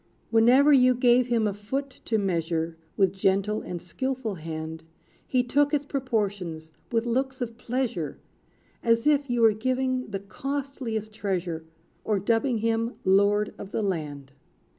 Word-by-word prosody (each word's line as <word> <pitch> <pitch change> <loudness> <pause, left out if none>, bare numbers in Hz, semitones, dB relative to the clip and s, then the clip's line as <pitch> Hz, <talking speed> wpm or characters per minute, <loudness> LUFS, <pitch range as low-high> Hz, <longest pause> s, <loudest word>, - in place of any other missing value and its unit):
Whenever 250 +6 +6
you 255 -2 +6
gave 245 0 +4
him 235 -3 +2
a 205 - 0
foot 265 +7 -4
to 225 - +1
measure. 165 -4 -1 0.2
With 195 -2 +3
gentle 195 +2 +1
and 175 - -5
skilful 245 +6 -3
hand, 160 -1 -6 0.5
He 255 -1 +2
took 285 +4 +2
its 290 0 -1
proportions, 205 - -2 0.2
with 230 0 +1
looks 260 +2 -1
of 235 -2 -4
pleasure, 240 - -2 0.6
As 230 -1 +2
if 290 -2 +3
you 240 -1 +1
were 225 -1 +6
giving 255 +3 -1
the 200 -2 -4
costliest 245 -1 -4
treasure, 180 -6 -3 0.4
Or 210 - +1
dubbing 230 +5 +1
him 230 +1 0
lord 205 +2 +3
of 195 - -7
the 215 - -2
land. 150 -8 -3
225 Hz, 145 wpm, -26 LUFS, 190-255 Hz, 0.6 s, Whenever